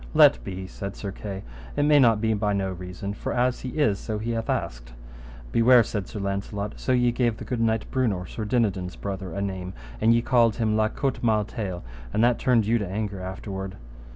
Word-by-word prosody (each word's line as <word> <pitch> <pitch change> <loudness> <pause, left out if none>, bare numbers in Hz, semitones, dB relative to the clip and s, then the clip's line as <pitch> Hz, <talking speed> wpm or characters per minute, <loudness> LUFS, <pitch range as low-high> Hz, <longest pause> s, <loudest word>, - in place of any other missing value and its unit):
Let - - +6
be 95 +4 -5
said 100 +1 -6
Sir 100 - -5
Kay, 95 0 -6 0.3
it 145 - +2
may 150 0 +6
not 115 -5 +5
be 110 -1 +2
by 105 -1 0
no 95 -1 0
reason, 90 +2 -6
for - - -4
as 125 +1 +1
he 130 - -5
is, 105 -10 +2
so 110 -2 -3
he 115 +2 -3
hath 115 -1 -2
asked. - - -3 0.6
Beware, 120 +1 +6
said 100 -3 -4
Sir 110 - -6
Launcelot, 100 +1 -3
so - - -1
ye 125 -1 +4
gave 120 -2 +1
the - - -8
good 125 -3 -2
knight 110 -1 +1
Brewnor, 110 -9 0
Sir 110 - -6
Dinadan's 100 -6 0
brother, 95 -2 -5
a 100 +3 -3
name, 95 -1 -4 0.3
and 115 - +5
ye 115 0 +3
called 115 -4 +4
him 110 -2 +1
La 110 0 +3
Cote 135 +3 -2
Male 110 -3 +2
Taile, 95 -5 -5 0.3
and 110 - +2
that 120 0 +3
turned 125 -5 +3
you 115 +2 +2
to 100 - -3
anger 100 -1 -3
afterward. 95 +1 -5
105 Hz, 215 wpm, -25 LUFS, 95-115 Hz, 0.6 s, Let